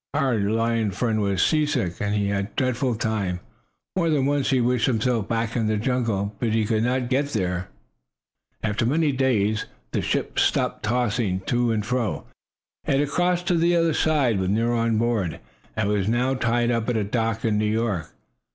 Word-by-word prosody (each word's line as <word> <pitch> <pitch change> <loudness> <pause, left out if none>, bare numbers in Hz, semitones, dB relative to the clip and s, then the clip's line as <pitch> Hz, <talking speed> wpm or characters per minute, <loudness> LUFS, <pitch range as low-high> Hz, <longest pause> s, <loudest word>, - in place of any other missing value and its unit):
Our 135 -6 +1
lion 115 +2 +1
friend 110 +2 -1
was 100 -3 +1
seasick, 150 - 0
and 105 0 0
he 100 -1 0
had 100 -1 0
a - - -25
dreadful 130 -1 0
time. 105 -5 -2 0.6
More 170 -3 +1
than 145 -4 +2
once 140 -1 +1
he 130 - +3
wished 125 -1 +2
himself 115 -3 0
back 115 -1 -1
in 115 -3 +1
the 110 0 +1
jungle, 110 -4 -1
but 115 -3 0
he 110 -1 +2
could 110 0 +1
not 125 +1 0
get 135 +3 +1
there. 90 -3 -1 1.0
After 105 +1 0
many 150 +5 +2
days 110 -6 +1 0.2
the - - 0
ship - - -1
stopped - - +1
tossing 110 -4 0
to 120 +4 0
and 105 -2 -1
fro. 120 -2 -2 0.6
It 135 - +2
had 145 -1 0
crossed 180 +3 +1
to 180 - +3
the 170 +1 +3
other 165 -1 +2
side, 140 -10 +2
with 95 0 -1
Nero 115 +4 +1
on 115 -1 +1
board, 110 -7 0 0.4
and 110 -3 0
was 105 -2 0
now 125 +4 +1
tied 120 -1 +1
up 115 0 -1
at 120 - +1
a 110 - +1
dock 115 +2 -1
in 105 -2 +1
New 105 0 +1
York. 110 -8 -1
115 Hz, 190 wpm, -24 LUFS, 105-130 Hz, 1.0 s, he